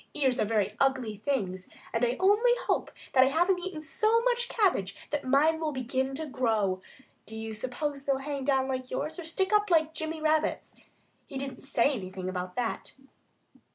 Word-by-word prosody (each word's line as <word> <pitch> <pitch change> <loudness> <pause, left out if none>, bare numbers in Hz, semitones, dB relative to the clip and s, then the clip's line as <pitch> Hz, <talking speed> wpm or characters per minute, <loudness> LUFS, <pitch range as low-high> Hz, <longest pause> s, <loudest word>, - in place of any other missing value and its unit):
Ears 265 -4 +1
are - - +3
very 210 -1 0
ugly 260 -5 +1
things, 200 -6 -2 0.2
and 230 - 0
I 245 +1 +2
only 415 +6 +5
hope - - 0 0.2
that 260 - +7
I - - +4
haven't 350 +6 +2
eaten 355 -4 -5
so 445 +8 +2
much 485 -1 +1
cabbage 270 - +1 0.2
that 295 -1 -1
mine 295 +5 +3
will 315 -2 -1
begin 265 0 -2
to 315 +3 -3
grow.... 220 -9 0 0.5
Do 220 - -8
you 220 0 -5
suppose 275 +5 -4
they'd 275 -1 +1
hang 280 -1 -3
down 265 -1 +2
like 255 -1 -3
yours 305 +7 -3
or 345 - -6
stick 380 +5 -1
up 420 -1 +4
like 320 -2 +3
Jimmy 315 0 -3
Rabbit's? 310 0 0 0.5
He 275 - -6
didn't 270 -1 -5
say 275 0 +3
anything 185 -6 -5
about 180 -1 -4
that." 240 -2 -3
275 Hz, 185 wpm, -29 LUFS, 230-320 Hz, 0.5 s, that